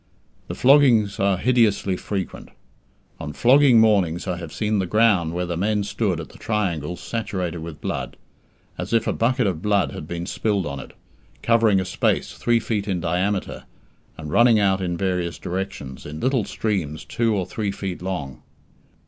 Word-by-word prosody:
The -, -, -5 dB
floggings 125 Hz, -7 st, +4 dB
are 100 Hz, -1 st, +2 dB
hideously 110 Hz, -4 st, +2 dB
frequent. 95 Hz, 0 st, -5 dB, 0.7 s
On 75 Hz, -, -6 dB
flogging 130 Hz, -, +5 dB
mornings 100 Hz, -7 st, +2 dB
I 90 Hz, -2 st, -2 dB
have 85 Hz, -3 st, -8 dB
seen 105 Hz, -1 st, -1 dB
the 95 Hz, -, -1 dB
ground 105 Hz, -5 st, +3 dB
where 90 Hz, +1 st, -2 dB
the 85 Hz, -1 st, -3 dB
men 105 Hz, +4 st, 0 dB
stood 100 Hz, -, -1 dB
at -, -, -7 dB
the -, -, -16 dB
triangles 90 Hz, -6 st, -2 dB
saturated 90 Hz, -7 st, -3 dB
with 80 Hz, -1 st, -8 dB
blood, -, -, -4 dB, 0.6 s
as -, -, -4 dB
if 115 Hz, -1 st, +3 dB
a -, -, 0 dB
bucket 125 Hz, +1 st, +1 dB
of 90 Hz, -5 st, -1 dB
blood 105 Hz, 0 st, +1 dB
had 75 Hz, -, -8 dB
been 85 Hz, 0 st, -4 dB
spilled 100 Hz, -1 st, -1 dB
on 70 Hz, -1 st, -5 dB
it, -, -, -10 dB, 0.5 s
covering 115 Hz, -4 st, +4 dB
a 95 Hz, -, -2 dB
space 90 Hz, -, 0 dB
three 120 Hz, -1 st, +1 dB
feet 105 Hz, -2 st, -2 dB
in 95 Hz, -3 st, -1 dB
diameter, 90 Hz, +4 st, -2 dB, 0.5 s
and 75 Hz, -1 st, -7 dB
running 120 Hz, +4 st, +5 dB
out 95 Hz, -2 st, +2 dB
in 90 Hz, -2 st, -2 dB
various 90 Hz, -3 st, -1 dB
directions, 90 Hz, -8 st, -5 dB
in 75 Hz, +1 st, -7 dB
little 130 Hz, -, +1 dB
streams 85 Hz, -8 st, -3 dB
two 115 Hz, -2 st, 0 dB
or 95 Hz, -3 st, -1 dB
three 100 Hz, +3 st, -3 dB
feet 95 Hz, -2 st, -5 dB
long. 90 Hz, -9 st, -5 dB
95 Hz, 175 wpm, -23 LUFS, 85-110 Hz, 0.7 s, flogging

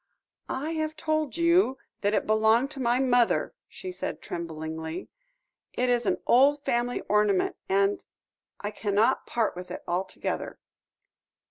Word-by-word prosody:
"I 290 Hz, +5 st, -2 dB
have 315 Hz, -1 st, -2 dB
told 310 Hz, -1 st, -1 dB
you 335 Hz, -4 st, +4 dB, 0.2 s
that 205 Hz, +1 st, +2 dB
it -, -, +1 dB
belonged 220 Hz, +5 st, +3 dB
to 280 Hz, -, -8 dB
my 245 Hz, 0 st, +2 dB
mother," 245 Hz, -3 st, +2 dB
she 370 Hz, -, -7 dB
said 360 Hz, -, -4 dB
tremblingly; 160 Hz, 0 st, -5 dB, 0.6 s
"it 250 Hz, 0 st, +1 dB
is 240 Hz, -1 st, +1 dB
an -, -, +2 dB
old 280 Hz, +3 st, +5 dB
family 240 Hz, +1 st, 0 dB
ornament, 210 Hz, -2 st, +2 dB
and 195 Hz, +1 st, +2 dB, 0.6 s
I 205 Hz, -, -4 dB
cannot 215 Hz, +4 st, +1 dB
part 230 Hz, -5 st, 0 dB
with 180 Hz, +1 st, -8 dB
it -, -, -7 dB
altogether." 185 Hz, +2 st, -3 dB
235 Hz, 135 wpm, -27 LUFS, 200-275 Hz, 0.6 s, old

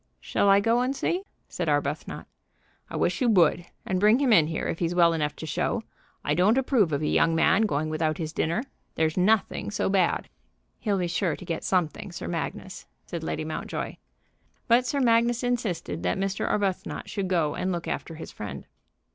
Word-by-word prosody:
"Shall 200 Hz, -, +1 dB
I 195 Hz, 0 st, +7 dB
go 230 Hz, +4 st, +2 dB
and 260 Hz, +2 st, 0 dB
see?" 350 Hz, +6 st, -1 dB, 0.3 s
said -, -, -3 dB
Arbuthnot. -, -, -2 dB, 0.6 s
"I -, -, -7 dB
wish -, -, 0 dB
you 245 Hz, -, +3 dB
would, 175 Hz, -4 st, +4 dB, 0.2 s
and 185 Hz, -1 st, 0 dB
bring 210 Hz, +4 st, +5 dB
him 265 Hz, -4 st, +3 dB
in 160 Hz, -7 st, +6 dB
here, 160 Hz, -, -2 dB
if -, -, -3 dB
he's 175 Hz, 0 st, -1 dB
well 170 Hz, -1 st, +5 dB
enough 150 Hz, -2 st, -1 dB
to -, -, -7 dB
show. 160 Hz, +8 st, -1 dB, 0.4 s
I -, -, +1 dB
don't 200 Hz, +7 st, +3 dB
approve 250 Hz, -, +2 dB
of 145 Hz, +1 st, -1 dB
a -, -, +1 dB
young 165 Hz, 0 st, +3 dB
man 190 Hz, +6 st, +4 dB
going 150 Hz, -3 st, -1 dB
without 155 Hz, 0 st, -1 dB
his 160 Hz, -1 st, -4 dB
dinner. 170 Hz, +9 st, 0 dB, 0.3 s
There's 160 Hz, 0 st, +1 dB
nothing 205 Hz, +4 st, +1 dB
so 210 Hz, -, -1 dB
bad." 190 Hz, -3 st, +1 dB, 0.5 s
"He'll 205 Hz, -3 st, 0 dB
be 180 Hz, -, 0 dB
sure 175 Hz, 0 st, 0 dB
to -, -, -11 dB
get 165 Hz, -1 st, -3 dB
something, 185 Hz, +2 st, -1 dB
Sir 170 Hz, -, -6 dB
Magnus," 175 Hz, +2 st, -5 dB, 0.2 s
said 170 Hz, -, -5 dB
Lady 155 Hz, -, -3 dB
Mountjoy. 155 Hz, -, -4 dB, 0.7 s
But 245 Hz, +1 st, +4 dB
Sir 280 Hz, +2 st, 0 dB
Magnus 235 Hz, 0 st, +3 dB
insisted 235 Hz, -, -2 dB
that 90 Hz, 0 st, 0 dB
Mr. 195 Hz, 0 st, -1 dB
Arbuthnot 195 Hz, -3 st, -1 dB
should 200 Hz, -3 st, -3 dB
go 165 Hz, -5 st, +1 dB
and 185 Hz, +1 st, -2 dB
look 170 Hz, -1 st, -3 dB
after 165 Hz, -, -4 dB
his 160 Hz, -, -8 dB
friend. 105 Hz, -2 st, -7 dB
185 Hz, 195 wpm, -26 LUFS, 165-220 Hz, 0.7 s, I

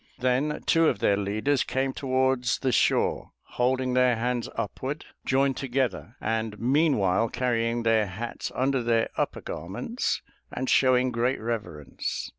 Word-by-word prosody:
Then 130 Hz, +4 st, 0 dB
two 165 Hz, 0 st, +4 dB
of -, -, -1 dB
their 100 Hz, -, +2 dB
leaders 110 Hz, +8 st, 0 dB
came 130 Hz, 0 st, -1 dB
towards 130 Hz, -3 st, +1 dB
the 130 Hz, -, 0 dB
shore, -, -, +1 dB
holding 130 Hz, +1 st, 0 dB
their 125 Hz, -1 st, +4 dB
hands 120 Hz, +1 st, -2 dB
upward 130 Hz, +7 st, -4 dB, 0.2 s
joined 135 Hz, 0 st, +2 dB
together, 130 Hz, -3 st, -2 dB
and 110 Hz, -1 st, -2 dB
meanwhile 120 Hz, -, +2 dB
carrying 120 Hz, -1 st, 0 dB
their 110 Hz, -2 st, +3 dB
hats 110 Hz, +6 st, -5 dB
under 135 Hz, 0 st, +1 dB
their 115 Hz, -1 st, +1 dB
upper -, -, -2 dB
garments 95 Hz, -, -3 dB, 0.3 s
and 130 Hz, +1 st, -3 dB
showing 130 Hz, -1 st, +4 dB
great 120 Hz, +2 st, 0 dB
reverence. 90 Hz, -, -4 dB
125 Hz, 135 wpm, -26 LUFS, 115-130 Hz, 0.3 s, two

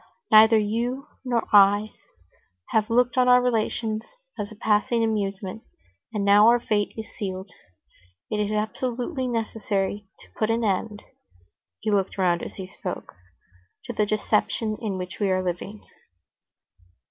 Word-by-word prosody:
"Neither 220 Hz, +1 st, +8 dB
you 235 Hz, +6 st, -1 dB, 0.2 s
nor 240 Hz, -3 st, 0 dB
I 205 Hz, +1 st, +6 dB, 0.8 s
have 215 Hz, -1 st, +1 dB
looked 245 Hz, +2 st, +2 dB
on 250 Hz, -, +4 dB
our 250 Hz, 0 st, +7 dB
relations 225 Hz, -2 st, -1 dB, 0.3 s
as 205 Hz, -, -5 dB
a -, -, -10 dB
passing 220 Hz, +2 st, +1 dB
amusement, 205 Hz, -1 st, -2 dB, 0.5 s
and 210 Hz, -3 st, -2 dB
now 205 Hz, +2 st, +6 dB
our 240 Hz, +1 st, +5 dB
fate 210 Hz, -3 st, 0 dB
is 220 Hz, -, -5 dB
sealed. 190 Hz, -1 st, -5 dB, 0.8 s
It 210 Hz, -, -1 dB
is 210 Hz, 0 st, 0 dB
absolutely 245 Hz, +5 st, -2 dB
necessary 210 Hz, -3 st, -2 dB
to -, -, -16 dB
put 215 Hz, -, -1 dB
an 230 Hz, +1 st, +1 dB
end"—he 185 Hz, -, -5 dB
looked 195 Hz, -1 st, 0 dB
round 175 Hz, -2 st, +2 dB
as -, -, -7 dB
he 190 Hz, -, -6 dB
spoke—"to 95 Hz, -, -10 dB
the 210 Hz, -2 st, +1 dB
deception 215 Hz, +1 st, 0 dB
in 205 Hz, -5 st, -2 dB
which 180 Hz, 0 st, -7 dB
we 200 Hz, -2 st, +1 dB
are 185 Hz, 0 st, +1 dB
living." 185 Hz, +4 st, -5 dB
210 Hz, 135 wpm, -25 LUFS, 195-225 Hz, 0.8 s, Neither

